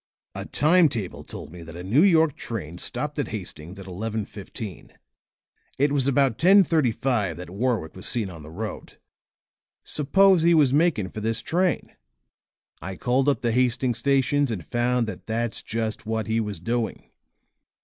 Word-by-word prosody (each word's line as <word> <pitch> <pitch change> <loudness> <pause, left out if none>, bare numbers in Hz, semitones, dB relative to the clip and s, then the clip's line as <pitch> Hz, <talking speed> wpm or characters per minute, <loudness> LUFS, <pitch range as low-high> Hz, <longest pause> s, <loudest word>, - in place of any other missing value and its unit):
A - - -6
time 160 +2 +4
table 110 -8 -5
told 75 - -9
me 90 0 -10
that 80 0 -10
a 90 - -7
New 110 +11 +3
York 160 -6 +4
train 90 -7 -6
stopped 150 +8 -4
at 140 - 0
Hastings 90 -4 -7
at 95 - -9
11:15. 105 0 -6 0.9
It 140 +1 +2
was 140 -2 +1
about 135 -4 +2
10:35 135 - +3
that 90 0 -9
Warwick 105 -5 -1
was 95 - -4
seen 115 -5 0
on 85 -3 -10
the 75 - -11
road. 105 +7 -7 0.9
Suppose 185 +5 +3
he 170 +1 +5
was 145 -5 +4
making 145 - +2
for 110 - -7
this 115 +2 -1
train. 175 +7 0 0.9
I 95 +4 -5
called 130 +8 +1
up 140 - 0
the 120 - +1
Hastings 125 0 +1
station 140 0 +2
and 90 -8 -4
found 120 0 +1
that 110 - -8
that's 115 0 -2
just 110 0 -4
what 110 0 -1
he 110 0 0
was 105 -5 -3
doing. 115 +5 -3
115 Hz, 160 wpm, -25 LUFS, 100-140 Hz, 0.9 s, he